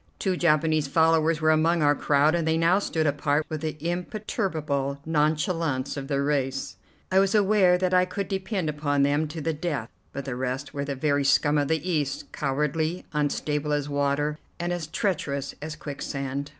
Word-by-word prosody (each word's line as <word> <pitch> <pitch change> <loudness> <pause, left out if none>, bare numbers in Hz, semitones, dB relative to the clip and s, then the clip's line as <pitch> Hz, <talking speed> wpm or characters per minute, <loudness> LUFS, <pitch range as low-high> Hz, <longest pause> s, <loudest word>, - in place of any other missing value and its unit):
Two 190 -2 0
Japanese 155 -3 +2
followers 160 +1 +3
were 155 0 +4
among 160 +1 +3
our 145 0 +5
crowd, 145 +1 +3
and 170 -2 0
they 160 0 +2
now 170 +4 +4
stood 160 -5 -1
apart 145 +1 +1
with 155 -2 -4
the 155 -1 -3
imperturbable 170 - -2
nonchalance 155 -2 0
of 135 -1 -5
their 140 -1 0
race. 135 -2 -1 0.3
I 190 - +5
was 195 +1 +2
aware 200 -3 +4
that 185 0 0
I 180 0 +5
could 185 +1 -4
depend 190 -2 -2
upon 145 -2 0
them 145 +2 +2
to 155 +2 -6
the 160 +2 -1
death; 150 -7 -3 0.2
but 140 - -6
the 135 -3 -3
rest 130 +3 -3
were 140 0 -3
the 140 -1 -3
very 145 +1 +1
scum 145 +2 +3
of 145 - 0
the 160 +2 -1
East, 145 -5 -2
cowardly, 150 +5 -1
unstable 150 0 -1
as 145 -1 -1
water, 145 +1 0 0.2
and 175 +1 -1
as 170 -3 -4
treacherous 150 -7 -2
as 155 +1 -5
quicksand. 140 -1 -4
150 Hz, 180 wpm, -26 LUFS, 145-170 Hz, 0.3 s, our